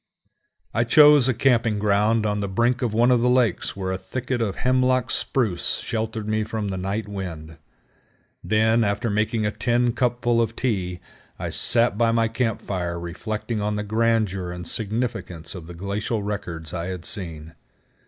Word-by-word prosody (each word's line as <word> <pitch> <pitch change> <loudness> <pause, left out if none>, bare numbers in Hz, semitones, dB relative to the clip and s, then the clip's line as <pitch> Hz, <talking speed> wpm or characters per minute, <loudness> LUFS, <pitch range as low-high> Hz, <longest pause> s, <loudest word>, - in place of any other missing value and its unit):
I 115 - +2
chose 145 +1 +7
a 130 - +3
camping 115 -4 +2
ground 105 +2 +2
on 105 -1 0
the 100 - -2
brink 120 +6 +1
of 120 -3 0
one 120 +3 +3
of 125 -2 +4
the 125 - +3
lakes 125 -6 +1
where 95 -1 -3
a 95 - -3
thicket 125 +6 -3
of 100 -4 -1
Hemlock 130 -1 +2
Spruce 105 -10 0
sheltered 110 -1 -3
me 110 0 0
from 110 -1 -3
the 95 - -3
night 100 +3 -3
wind. 85 -6 -7 0.9
Then, 110 +2 +3
after 105 +2 0
making 110 +1 0
a 105 - +1
tin 120 +1 +1
cupful 120 -1 +1
of 115 0 -1
tea, 95 -9 -2 0.4
I - - -4
sat 115 -2 +2
by 115 -1 +4
my 115 0 +2
camp 115 0 -2
fire 90 -3 -3
reflecting 105 +6 -4
on 105 0 -1
the 105 - -2
grandeur 110 -4 0
and 90 -1 -7
significance 105 -7 -3
of 90 -4 -9
the 90 - -9
glacial 100 +4 -3
records 85 -6 -5
I 85 - -3
had 90 -2 -6
seen. 80 -6 -6
110 Hz, 175 wpm, -23 LUFS, 95-115 Hz, 0.9 s, chose